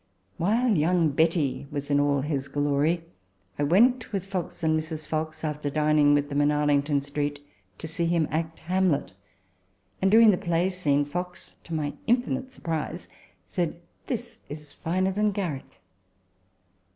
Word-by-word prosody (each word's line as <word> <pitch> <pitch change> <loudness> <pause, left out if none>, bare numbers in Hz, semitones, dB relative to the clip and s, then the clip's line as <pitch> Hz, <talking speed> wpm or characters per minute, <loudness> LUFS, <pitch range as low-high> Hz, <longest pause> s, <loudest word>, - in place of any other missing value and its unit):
While 225 +6 +2
young 165 +1 +3
Betty 155 -2 +1
was 145 -1 -4
in 145 - +4
all 145 -1 +2
his 140 -1 -2
glory, 145 +4 +1 0.6
I - - +1
went 230 - +3
with 195 -3 -2
Fox 185 -4 -5
and 160 0 +3
Mrs. 155 0 -3
Fox, 155 0 -3
after 150 -2 -2
dining 150 0 +4
with 145 0 +1
them 145 0 +1
in 145 - +4
Arlington 145 -1 +2
Street, 145 +1 -3 0.4
to - - -6
see 165 +1 -1
him 165 -2 +2
act 160 +1 -2
Hamlet; 185 -4 +1 0.9
and, 190 - +4
during 220 +1 +7
the 180 - 0
play 175 -1 +1
scene, 145 -6 +1
Fox, 180 +4 -6
to 165 - -4
my 145 -2 -2
infinite 250 +2 +1
surprise, 165 -11 -4 0.4
said, - - -2
" - - -39
This - - -4
is 150 0 -7
finer 185 +3 0
than 210 +1 +1
Garrick." 150 -9 -5
155 Hz, 155 wpm, -26 LUFS, 145-180 Hz, 0.9 s, during